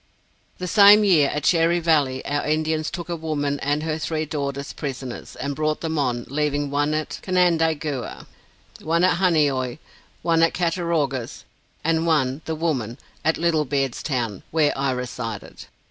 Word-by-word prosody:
The 180 - -5
same 205 +3 +7
year, 165 -8 +4
at 150 - -3
Cherry 170 0 +3
Valley, 145 -6 +1
our 145 +1 -1
Indians 155 0 0
took 175 -1 -6
a 170 - -2
woman 145 -3 -2
and 145 +2 -1
her 160 0 -2
three 155 0 -2
daughters 140 -2 -4
prisoners, 130 -3 -6
and 140 0 -4
brought 155 +1 -1
them 160 -2 -2
on, 120 -3 -1
leaving 145 0 -1
one 145 +1 +1
at 155 0 -3
Canandaigua, 160 -6 0 0.6
one 165 +2 +1
at 185 - +4
Honeoy, 145 -8 +2 0.5
one 165 -1 +3
at 165 - +3
Cattaraugus, 165 -8 -1 0.4
and 165 +1 +1
one 140 -3 +1
(the 160 - -2
woman) 135 -8 -2 0.3
at 160 +1 +2
Little 165 -2 +2
Beard's 135 -2 -1
Town, 120 -9 -2
where 155 -2 +2
I 135 0 0
resided. 125 -4 -5
155 Hz, 155 wpm, -23 LUFS, 140-165 Hz, 0.6 s, same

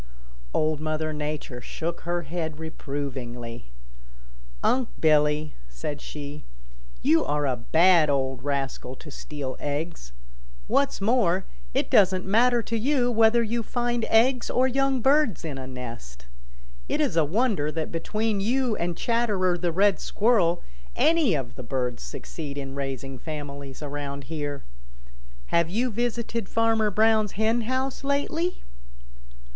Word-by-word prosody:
Old 155 - +1
Mother 155 0 -2
Nature 150 -4 -4
shook 165 +6 -4
her 175 0 -2
head 160 -1 -4
reprovingly. 130 -6 -5 1.0
"Unc' 255 -2 +2
Billy," 150 -1 +3 0.2
said - - -5
she, 145 0 -7 0.6
"you 165 - +4
are 145 0 0
a 130 -2 +1
bad 160 +6 +4
old 135 -2 0
rascal 135 -2 -2
to 150 +2 -12
steal 140 -2 -5
eggs. 145 - -4 0.5
What's 280 -7 +1
more, 195 -4 +2 0.3
it - - 0
doesn't 185 -2 +5
matter 235 +4 +4
to 230 - -3
you 250 0 +2
much 240 - -2
whether 225 +1 +5
you 230 +1 -1
find 240 0 -1
eggs 245 +3 +3
or 255 +1 +3
young 270 0 +1
birds 270 - +3
in 145 -4 -4
a 130 - -6
nest. 115 - -8 0.6
It - - 0
is - - +1
a 165 - +5
wonder 180 - +1
that 160 0 -3
between 210 +5 -1
you 240 +3 +1
and 170 0 -2
Chatterer 210 -6 +1
the 175 -1 -1
Red 195 +3 +3
Squirrel 200 -6 +2 0.3
any 315 - +4
of 130 -4 -3
the - - -8
birds 125 0 -2
succeed 60 - -6
in 135 -1 -5
raising 135 -1 -4
families 140 -2 -7
around 140 -1 -5
here. 145 -2 -4 0.9
Have 170 -1 +3
you 235 +7 0
visited 235 -1 -2
Farmer 225 -1 +2
Brown's 215 0 +3
hen 220 +3 +2
house 260 +1 -1
lately?" 310 +5 -1
165 Hz, 140 wpm, -26 LUFS, 145-225 Hz, 1.0 s, doesn't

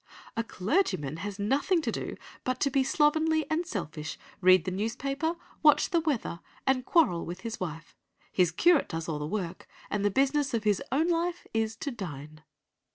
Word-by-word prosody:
A 230 - 0
clergyman 185 - 0
has 200 +3 -5
nothing 275 - +2
to - - 0
do - - -4 0.3
but 255 0 -1
to 280 - +2
be 270 0 +3
slovenly 315 +2 +2
and 330 +2 0
selfish, 150 - -4 0.2
read 185 -2 +6
the 185 - -1
newspaper, 275 - -1 0.3
watch 300 +4 +5
the 340 - +4
weather, 285 - -1 0.3
and 265 -1 +2
quarrel 255 - +3
with 175 +2 -6
his 230 +1 -5
wife. 160 -3 -6 0.4
His 180 -3 +3
curate 335 - +4
does 165 0 -4
all 155 -3 -2
the 150 - -3
work, 185 -1 -4 0.2
and 205 -1 0
the 205 - +4
business 275 +3 +2
of 225 - -1
his 210 -2 +2
own 310 +5 +2
life 345 +1 0
is 225 0 0
to 280 +5 -4
dine. 155 - -7
230 Hz, 180 wpm, -29 LUFS, 180-300 Hz, 0.4 s, read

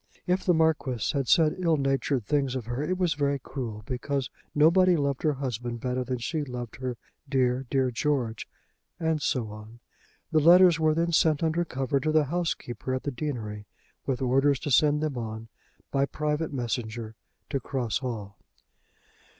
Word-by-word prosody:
If 180 +1 +1
the 180 - +3
Marquis 155 -8 +1
had 140 -3 -1
said 160 0 +4
ill 165 -3 +2
natured 135 -3 0
things 135 0 0
of 125 -4 -3
her 120 +3 -3
it 180 +5 -1
was 180 -4 +1
very 140 -1 0
cruel, 120 -5 -6
because 130 +2 -2 0.2
nobody 175 +4 +5
loved 140 -2 -1
her 155 -2 +2
husband 120 -3 -4
better 125 +1 -1
than 125 0 -2
she 150 +6 -2
loved 125 -4 -6
her 130 -2 -4 0.3
dear, 130 -1 +1
dear 130 -2 +1
George, 120 -4 -1 0.5
and 160 -2 0
so 120 -5 0
on. 110 +2 -11 0.5
The 160 - +4
letters 175 +2 +7
were 155 -1 +3
then 170 +1 +1
sent 160 -2 +3
under 165 +2 +1
cover 135 -2 -1
to 155 +3 0
the 155 -1 +4
housekeeper 145 -5 -2
at 130 - -4
the 145 - -2
deanery, 115 -7 -5 0.4
with 135 -1 -1
orders 135 +2 +3
to 145 - -3
send 150 +2 +4
them 150 -5 -2
on 110 0 -6 0.4
by 140 0 +2
private 150 +1 -2
messenger 120 -3 -3 0.4
to 140 - 0
Cross 125 -4 -2
Hall. 105 -7 -6
135 Hz, 170 wpm, -27 LUFS, 120-155 Hz, 0.5 s, letters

